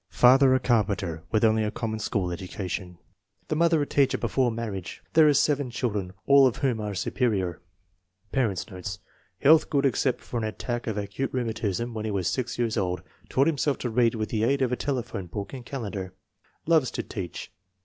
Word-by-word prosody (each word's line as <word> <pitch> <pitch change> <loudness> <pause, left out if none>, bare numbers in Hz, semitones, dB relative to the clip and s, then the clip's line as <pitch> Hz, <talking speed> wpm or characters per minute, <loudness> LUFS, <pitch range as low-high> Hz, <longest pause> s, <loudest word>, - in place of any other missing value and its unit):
Father 130 +1 +6
a - - +3
carpenter, 100 -9 0
with 110 0 +1
only 110 0 +4
a 105 - 0
common 110 0 -3
school 100 -4 -1
education. 90 0 -5 0.5
The - - 0
mother 165 -1 +3
a - - -2
teacher 140 -1 +2
before 130 -2 +1
marriage. 110 -6 -5
There 160 -1 +7
are 150 - +5
seven 145 -3 +2
children, 105 -6 -2
all 140 -1 +7
of 125 - -1
whom 130 -5 0
are 105 -1 -4
superior. 95 -4 -1 0.7
Parents 115 -8 0
9 95 -5 -10
notes. 90 0 -5 0.4
Health 155 +2 +6
good 140 -2 +2
except 130 -1 +1
for 120 - -5
an - - -3
attack 120 +2 -3
of 110 -2 -2
acute 105 +6 -3
rheumatism 115 -2 -2
when 110 -1 -4
he - - -1
was 95 -4 -1
6 125 -2 -2
years 115 -3 0
old. 90 -2 -1 0.3
Taught 135 - +3
himself 145 -2 +1
to 120 - -3
read 115 0 +3
with 110 -1 -2
the 110 -1 -1
aid 135 +3 +2
of 125 - 0
a - - +2
telephone 120 -9 -3
book 100 +5 -6
and 130 -3 -8
calendar. 100 -8 -5 0.5
Loves 155 -6 +3
to - - -4
teach. 95 -6 -6
115 Hz, 195 wpm, -26 LUFS, 100-130 Hz, 0.7 s, There